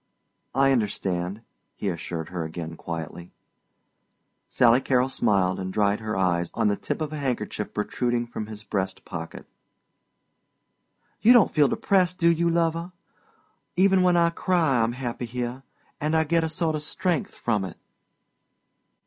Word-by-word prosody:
"I 135 0 +4
understand," 100 -4 -1 0.3
he 105 - -4
assured 85 -1 -5
her 90 -2 -3
again 80 0 -6
quietly. 85 +1 -7 1.1
Sally 120 +1 +5
Carol 130 -1 +2
smiled 100 -8 +1
and 95 0 -4
dried 100 +1 +1
her 110 -1 -3
eyes 85 -2 +1
on 115 -2 +2
the 100 - +1
tip 160 - -4
of 155 -1 -3
a 150 - -4
handkerchief 125 -5 -3
protruding 120 +3 -1
from 110 -2 -6
his 110 -1 -9
breast 95 -2 -3
pocket. 80 -2 -7 1.8
"You 240 - +7
don't 240 -5 +5
feel 150 -2 +4
depressed, 185 +1 +1
do 170 -1 +4
you, 170 +1 +1
lover? 170 +1 0 0.8
Even 190 +1 +4
when 180 -1 +4
I 170 0 +4
cry 165 -8 +2
I'm 115 +1 +1
happy 125 -1 -4
here, 125 +2 -4 0.4
and 155 +2 0
I 160 - +4
get 165 +1 +1
a 160 - -1
sort 160 0 0
of 150 - -3
strength 170 +1 -1
from 110 -4 0
it." 95 - -7
120 Hz, 150 wpm, -25 LUFS, 95-160 Hz, 1.8 s, You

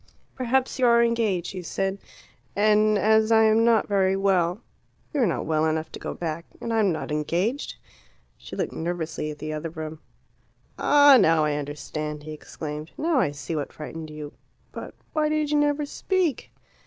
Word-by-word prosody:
"Perhaps 260 +1 0
you 250 - +4
are 235 0 +5
engaged," 225 -7 +1
she 185 - -6
said. 195 +3 -2 0.6
"And 215 +1 +4
as 220 +2 +3
I 220 0 +6
am 220 +1 +4
not 230 -2 +3
very 195 -2 +2
well 190 0 +1 0.3
" - - -39
"You 290 - +1
are 235 - +4
not 170 - -2
well 155 -1 +1
enough 160 0 -1
to - - -8
go - - -5
back. 165 0 -4
And 230 - -3
I 225 - +2
am 200 -4 +3
not 155 -1 -4
engaged." 175 - -1 0.6
She - - -10
looked - - -2
nervously 160 -2 -3
at 150 - -7
the 155 +1 -5
other 155 +2 -4
room. 155 -1 -7 0.8
"Ah, 285 -2 +7
now 160 -4 +4
I 150 - 0
understand," 150 +1 -5
he 155 - -8
exclaimed. 150 0 -7
"Now 320 -3 +1
I 195 - +2
see 145 +2 -5
what 145 -2 -3
frightened 155 +1 -8
you. 150 -1 -8 0.4
But - - -8 0.2
why 305 -1 +1
did 305 -1 0
you 295 - +3
never 295 0 +1
speak?" 350 0 -1
190 Hz, 185 wpm, -25 LUFS, 155-235 Hz, 0.8 s, Ah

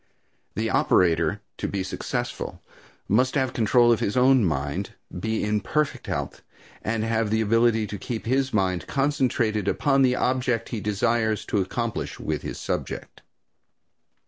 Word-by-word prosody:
The - - -1
operator, 85 -2 +2 0.2
to - - -2
be 100 -1 -2
successful, 95 - -4 0.5
must 125 +6 +2
have 130 -2 +1
control 120 +1 +4
of 115 - +3
his 105 - -1
own 130 -1 +5
mind, 70 -4 -2 0.2
be 110 +4 -1
in 105 0 +1
perfect 150 +8 -1
health - - -3 0.4
and 110 +1 -1
have 115 -1 0
the 110 +1 +1
ability 115 0 +3
to 105 -1 -6
keep 115 +2 -5
his 130 +2 +1
mind 95 -5 0
concentrated 130 -7 0
upon 135 +5 +2
the 130 -1 +4
object 125 -3 0
he 115 -4 -4
desires 110 +1 0
to 105 - +1
accomplish 115 +4 -3
with - - -2
his - - -5
subject. - - -4
115 Hz, 145 wpm, -25 LUFS, 105-125 Hz, 0.5 s, own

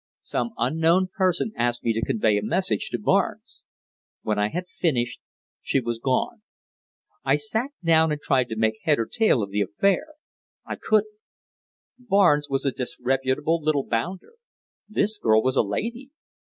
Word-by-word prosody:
Some 235 - -3
unknown 165 +4 +2
person 185 +2 +1
asked 120 0 -1
me 115 - +1
to 115 +1 -2
convey 110 -2 +1
a - - -6
message 110 - 0
to - - -2
Barnes. - - -1 0.6
When 105 -1 -1
I 105 0 +1
had 180 +6 -4
finished 125 -10 -1 0.4
she - - +1
was 120 -2 -3
gone. 135 - -1 0.8
I - - +3
sat 275 - -1
down 160 -1 +4
and 150 - -2
tried 130 -4 +1
to 110 - -4
make 110 0 0
head 150 -2 +2
or 115 - 0
tail 220 - +2
of 100 - -6
the 105 +1 0
affair. 195 - 0 0.5
I - - -4
couldn't. 215 0 0 0.8
Barnes 195 -11 +3
was 135 +1 -1
a 135 - +2
disreputable 135 +5 -1
little 150 -2 0
bounder! 180 - -3 0.6
This 215 0 +1
girl 110 -1 +3
was 130 0 +1
a - - +5
lady. 235 - -4
145 Hz, 160 wpm, -24 LUFS, 115-190 Hz, 0.8 s, a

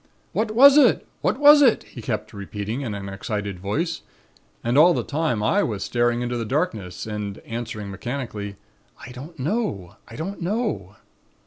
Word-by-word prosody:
'What 220 0 0
was 280 +4 +9
it? - - +4 0.2
What - - +1
was 295 0 +8
it?' 250 -6 +4
he - - -11
kept - - -4
repeating 105 +4 -5
in 115 -7 -3
an 100 -1 -6
excited 100 -1 -4
voice. 155 - -2 0.6
And 120 +2 0
all 165 +4 +7
the - - -1
time 145 -8 -1
I 200 - +3
was 105 - -2
staring 120 0 +1
into 120 0 -2
the 115 - -2
darkness 110 - -2
and 105 -2 -4
answering, 115 -3 -5
mechanically, 105 -1 -5 0.5
'I 125 - -9
don't 145 +7 -10
know. 130 - -2
I 110 - -11
don't 190 +7 -5
know.' 170 - -2
120 Hz, 165 wpm, -23 LUFS, 105-165 Hz, 0.6 s, was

